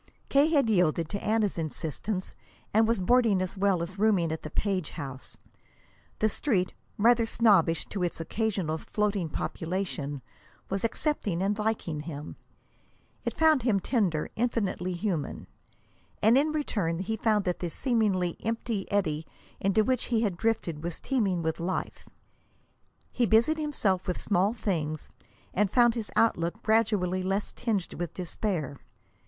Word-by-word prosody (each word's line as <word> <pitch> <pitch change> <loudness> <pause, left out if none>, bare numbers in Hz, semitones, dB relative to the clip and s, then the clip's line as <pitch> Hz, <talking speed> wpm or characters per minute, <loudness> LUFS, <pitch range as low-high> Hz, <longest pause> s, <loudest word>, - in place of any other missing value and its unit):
K. 280 +2 +5
had 290 -6 +3
yielded 175 -6 +2
to 200 - -4
Anna's 215 -4 +1
insistence, 165 +5 -3 0.4
and 220 +1 +5
was 230 -2 +2
boarding 225 0 +4
as 185 +1 -2
well 195 -3 +2
as 185 +3 -7
rooming 200 -7 +3
at 160 - -3
the 155 - -6
Page 185 -1 -1
house. 135 -2 -7 0.8
The 215 - +3
Street, 205 -5 0 0.2
rather 230 +1 +4
snobbish 195 -9 +3
to 200 - -4
its 175 -2 -1
occasional 180 -3 -1
floating 205 -4 -1
population, 160 -5 -3 0.5
was 195 0 -1
accepting 220 - -1
and 200 +2 +1
liking 210 -8 -1
him. 150 -1 -7 0.9
It - - -3
found 315 -4 +5
him 225 -5 +2
tender, 185 - 0
infinitely 210 -6 -1
human. 175 -6 -2 0.7
And 220 +3 +5
in 295 +3 +3
return 205 - -1
he 195 +5 -2
found 215 -1 +1
that 180 -1 -1
this 175 -2 -4
seemingly 205 -9 +1
empty 225 -3 -2
eddy 160 -7 0 0.3
into 195 +3 +3
which 255 +1 +1
he 230 -2 +1
had 205 -6 0
drifted 170 -7 -1
was 170 -1 -3
teeming 200 -10 0
with 160 +1 -1
life. 175 +3 -3 1.0
He 240 -2 +1
busied 230 +10 +4
himself 215 -12 0
with 180 - -1
small 200 +1 +2
things, 160 -9 -3 0.4
and 205 +1 +2
found 240 +1 +5
his 225 -3 -4
outlook 215 -1 +1
gradually 210 -5 +2
less 195 +2 -1
tinged 215 -7 -2
with 175 -1 -5
despair. 175 -5 -2
195 Hz, 145 wpm, -28 LUFS, 170-225 Hz, 1.0 s, K